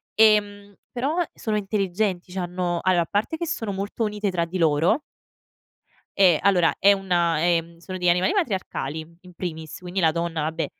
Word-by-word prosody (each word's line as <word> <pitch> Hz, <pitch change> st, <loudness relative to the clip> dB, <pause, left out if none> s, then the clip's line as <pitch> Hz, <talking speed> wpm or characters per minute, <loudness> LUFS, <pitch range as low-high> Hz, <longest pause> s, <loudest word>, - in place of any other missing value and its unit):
Ehm, 205 Hz, -2 st, +3 dB, 0.2 s
però 280 Hz, +8 st, -1 dB
sono 215 Hz, -2 st, -2 dB
intelligenti, 195 Hz, -2 st, -1 dB
c'hanno 180 Hz, -1 st, -2 dB
allora, 185 Hz, -2 st, +3 dB
a -, -, -9 dB
parte 205 Hz, -, -1 dB
che 340 Hz, -, -3 dB
sono 225 Hz, -10 st, -3 dB
molto 200 Hz, +4 st, -3 dB
unite 210 Hz, -2 st, -1 dB
tra 170 Hz, -2 st, 0 dB
di 175 Hz, +3 st, -5 dB
loro 165 Hz, -, +3 dB, 1.2 s
Eh, 180 Hz, -4 st, +7 dB
allora 180 Hz, -4 st, +3 dB
è 200 Hz, +2 st, +7 dB
una 175 Hz, -5 st, +1 dB
ehm, 170 Hz, 0 st, 0 dB
sono 185 Hz, +2 st, -7 dB
degli 180 Hz, -1 st, 0 dB
animali 180 Hz, -, +3 dB
matriarcali 185 Hz, -, -2 dB
in 180 Hz, -1 st, -16 dB
primis 160 Hz, -3 st, -6 dB
quindi 180 Hz, +1 st, -4 dB
la 165 Hz, -3 st, +4 dB
donna, 170 Hz, 0 st, -2 dB
vabbè, 160 Hz, +2 st, -2 dB
185 Hz, 165 wpm, -24 LUFS, 170-205 Hz, 1.2 s, Eh